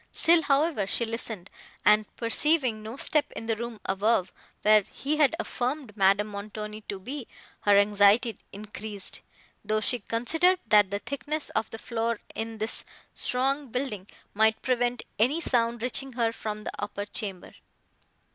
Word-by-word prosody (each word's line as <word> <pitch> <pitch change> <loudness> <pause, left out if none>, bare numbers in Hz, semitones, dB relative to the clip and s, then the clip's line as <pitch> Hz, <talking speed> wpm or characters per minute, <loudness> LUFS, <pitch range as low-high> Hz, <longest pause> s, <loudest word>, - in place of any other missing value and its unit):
Still, 335 0 +5
however, 285 - +1
she 235 - 0
listened, 225 -4 -5 0.3
and, 210 0 +5
perceiving 245 -1 +1
no 220 +4 -7
step 295 0 +1
in 225 - -6
the 225 -1 0
room 235 0 -6
above, 195 0 +1 0.3
where 215 0 +6
he 285 +9 -3
had 305 +1 +4
affirmed 255 -7 -3
Madame 200 0 +4
Montoni 210 +1 -6
to 200 - -3
be, 255 +5 -6 0.3
her 205 -1 +4
anxiety 205 +2 +4
increased, 210 -1 -7 0.4
though 215 +1 +1
she 245 +3 0
considered, 320 - +2
that 205 -2 +5
the 200 - -1
thickness 290 +6 -4
of 220 0 -1
the 225 - -7
floor 230 -1 -2
in 225 0 -4
this 220 +1 -1 0.3
strong 270 +3 0
building 235 -6 -4 0.3
might 220 +1 +3
prevent 245 -1 0 0.2
any 260 +9 +3
sound 235 -6 +1
reaching 265 +1 +1
her 235 -2 +1
from 215 -1 -5
the - - -4
upper 205 0 -4
chamber. 195 -3 -4
225 Hz, 150 wpm, -27 LUFS, 210-255 Hz, 0.4 s, where